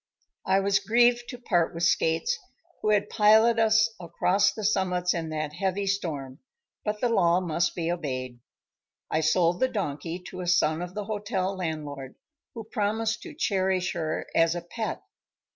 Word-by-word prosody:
_"] - - -1
I 190 - +5
was 195 0 +2
grieved 240 +4 +3
to 245 - -6
part 175 -8 0
with 170 - -3
Skates, 165 - +2 0.5
who 215 - 0
had 205 -1 +3
piloted 220 +2 +5
us 225 0 +4
across 180 +3 +2
the 215 - -7
summits 180 -3 +1
in 165 -2 -3
that 155 -1 -3
heavy 190 +3 -1
storm, 150 -9 -3 0.4
but 210 0 -3
the 245 - +3
law 180 -5 +3
must 175 -1 -1
be 170 -1 -1
obeyed. 130 -7 -4 0.7
I 155 - +1
sold 170 +3 +2
the 260 - +3
donkey 165 - -3
to 185 - -7
a 180 - -5
son 165 -2 +2
of 180 +1 -6
the 210 -1 -3
hotel 205 -2 -2
landlord, 150 -6 -5 0.4
who 225 - -6
promised 220 0 -1
to 340 -4 -10
cherish 190 - 0
her 160 -3 -3
as 165 0 +3
a 175 - -3
pet. 220 +6 -5
185 Hz, 170 wpm, -27 LUFS, 165-210 Hz, 0.7 s, I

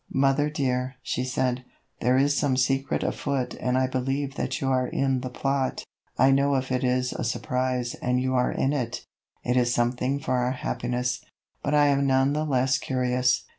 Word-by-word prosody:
"Mother 135 +2 +3
dear," 130 -3 -1
she 125 - -2
said, 125 0 -1 0.4
"there 125 +2 +3
is 145 +2 +3
some 140 -3 +1
secret 135 +2 +1
afoot 140 -3 -2
and 125 0 0
I 130 - +3
believe 135 +2 -2
that - - -3
you 135 - -2
are 130 -1 +2
in 135 -1 0
the 130 - -4
plot. 135 +1 -1 0.3
I 135 +1 +5
know 140 +1 +3
if 130 -1 -2
it 130 +1 0
is 125 0 +1
a - - -4
surprise 125 0 -1
and 125 0 +1
you 130 0 0
are 125 -1 +2
in 135 - 0
it, 125 -3 -3 0.4
it 125 - 0
is 120 -1 +3
something 125 +3 0
for 130 -2 -1
our 125 +1 +1
happiness, 125 0 -2 0.4
but 145 +1 0
I 145 0 +5
am 140 0 +2
none 135 +1 +3
the 155 +1 0
less 130 -2 +2
curious." 125 -1 +1
130 Hz, 190 wpm, -26 LUFS, 125-135 Hz, 0.4 s, I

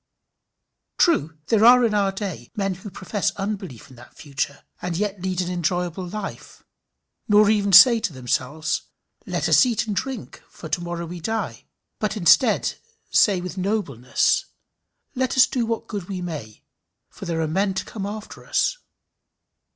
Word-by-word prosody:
True, 160 - +2
there 220 -1 +3
are 245 +1 +7
in 220 - 0
our 200 -2 +2
day 195 - -6
men 195 -2 -1
who 185 +3 -9
profess 195 +2 -2
unbelief 195 - -5
in 130 - -15
that 120 - -16
future, 140 -1 -4 0.2
and 175 -2 -3
yet 200 -1 -2
lead 185 -1 -1
an 180 0 -3
enjoyable 180 +1 -2
life, 200 +2 -7 0.6
nor 210 0 +5
even 200 -2 +1
say 230 +5 +9
to 210 - -2
themselves, 140 +4 -2 0.5
"Let - - -1
us - - +6
eat 240 -4 0
and 210 -2 -3
drink, 265 0 -5
for 160 - -10
to 155 - -1
morrow 170 0 -4
we 175 +1 -7
die;" 225 +7 -4 0.3
but 215 -1 -1
say - - -6
instead, 195 +8 +4 0.7
with 180 +1 -6
nobleness, 175 - 0 0.7
"Let 260 -1 -1
us 255 - +8
do 240 -3 -2
what 230 -1 -2
good 200 -4 -5
we 190 -2 -4
may, 150 -12 -7 0.4
for 195 - -11
there 165 -2 -2
are 160 - 0
men 190 +4 0
to - - -2
come 200 -3 -5
after 215 +1 -8
us." - - 0
190 Hz, 165 wpm, -23 LUFS, 170-215 Hz, 0.7 s, say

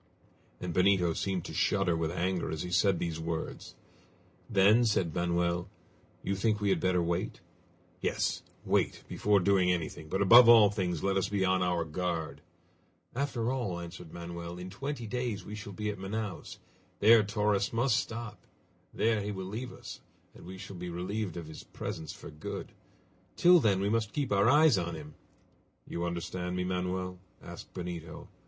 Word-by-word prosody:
And 90 -1 -4
Benito 90 -1 +3
seemed 95 0 -2
to - - -7
shudder 95 -4 +2
with 80 -1 -1
anger 90 +1 -1
as 80 - -3
he 90 - -6
said 90 +1 +3
these 85 -1 -3
words. 80 0 -5 0.7
"Then," 105 +2 +5
said 95 -8 +1
Manoel, 85 +1 0 0.5
"you 100 - -1
think 105 +2 +1
we 100 -1 0
had 95 -3 +2
better 90 0 +2
wait?" 85 +2 -2 0.6
"Yes; - - 0 0.2
wait, - - +1
before 105 -1 +2
doing 95 -1 +3
anything, 80 -2 -3
but 95 - -1
above 115 +5 +8
all 110 -3 +8
things 90 -6 -2
let 95 0 +1
us 95 - 0
be 100 -2 +1
on 95 0 +2
our 90 -2 +1
guard!" 85 0 -3 0.7
"After 125 -3 -1
all," 115 -10 -2
answered 85 -1 -9
Manoel, 85 0 -7
"in 90 +1 -7
twenty 135 +3 -4
days 120 -2 -3
we 105 - -8
shall 105 -1 -7
be 105 +2 -3
at 100 - -9
Manaos. 100 -1 -5 0.4
There 110 +2 +7
Torres 105 -1 0
must 120 0 +2
stop. 115 -1 -5 0.4
There 110 -2 +1
he 105 +1 -3
will 95 -2 -5
leave 115 +6 -5
us, - - -10 0.3
and - - -13
we 95 +1 -8
shall 95 0 -9
be 90 0 -5
relieved 90 +2 -3
of 85 - -5
his 80 - -10
presence 80 -1 -6
for - - -10
good! 75 0 -6 0.6
Till 175 0 +7
then 100 -8 +2
we 100 - 0
must 110 0 0
keep 145 -5 -2
our 100 +3 +4
eyes 150 -6 +6
on 85 -1 -3
him!" 75 -1 -9 0.7
"You 85 0 -3
understand 85 +1 -3
me, 90 - -1
Manoel?" 90 0 -2 0.2
asked - - -11
Benito. 85 -3 -6
95 Hz, 175 wpm, -30 LUFS, 85-105 Hz, 0.7 s, above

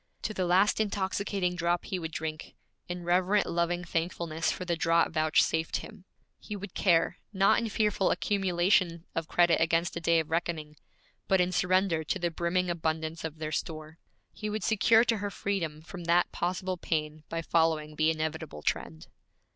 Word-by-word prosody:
To 215 - -2
the 185 -3 -1
last 190 +5 +3
intoxicating 195 -3 -1
drop 175 0 0
he 185 - -3
would 165 -1 -5
drink, 155 0 -5 0.3
in 175 0 -4
reverent 185 +4 +2
loving 175 +1 -1
thankfulness 165 -1 -2
for 185 - -5
the 175 -1 0
draught 165 0 +2
vouchsafed 160 0 +2
him. 210 -4 -11 0.3
He 210 - -7
would 200 -2 -7
care, 175 -1 +2
not 195 -1 +4
in 230 - -2
fearful 210 -2 +1
accumulation 180 -3 +1
of 165 -1 -3
credit 175 -2 +3
against 165 +1 +1
a 170 - -4
day 170 0 +3
of 160 0 -4
reckoning, 160 -2 -2 0.5
but 190 - +3
in 180 0 +2
surrender 180 -1 +2
to 190 - -1
the 175 -2 -1
brimming 175 +2 0
abundance 160 -1 -2
of 160 -1 -5
their 155 -1 -4
store. 155 +1 -5 0.3
He 215 - -5
would 210 -1 -3
secure 225 +1 +4
to 230 -2 +1
her 205 0 -3
freedom 170 -7 -3
from 175 +1 -9
that 170 +1 +3
possible 185 +1 -2
pain 155 -2 -2
by 165 0 -3
following 160 -2 +1
the 155 +1 +3
inevitable 155 - -3
trend. 80 0 -2
170 Hz, 170 wpm, -29 LUFS, 160-185 Hz, 0.5 s, not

